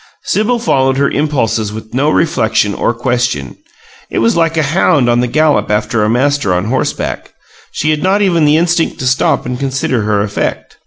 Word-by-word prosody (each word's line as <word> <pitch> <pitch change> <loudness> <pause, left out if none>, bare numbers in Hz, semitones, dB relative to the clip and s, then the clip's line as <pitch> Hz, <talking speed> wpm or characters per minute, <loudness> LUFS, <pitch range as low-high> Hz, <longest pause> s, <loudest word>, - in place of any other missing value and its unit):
Sibyl 225 +4 0
followed 135 - +1
her 140 0 +1
impulses 125 -8 -1
with 110 +1 -9
no 140 +4 +1
reflection 110 -10 +1
or - - 0
question 120 - -2 0.5
it - - -4
was 115 0 +2
like 165 -1 +1
a 160 - +2
hound 145 -3 +2
on 120 0 +2
the 125 - +1
gallop 155 +4 +1
after 105 +1 0
a 105 - +1
master 130 -4 +1
on 90 +2 -1
horseback. 130 +4 -3 0.4
She 155 - -1
had 155 -1 -1
not 195 +2 +2
even 170 -5 +2
the 150 +1 +4
instinct 170 0 0
to 130 - -5
stop 140 +4 +1
and 125 0 -4
consider 135 -3 -1
her 105 -1 0
effect. 105 -1 -4
130 Hz, 190 wpm, -13 LUFS, 115-155 Hz, 0.5 s, the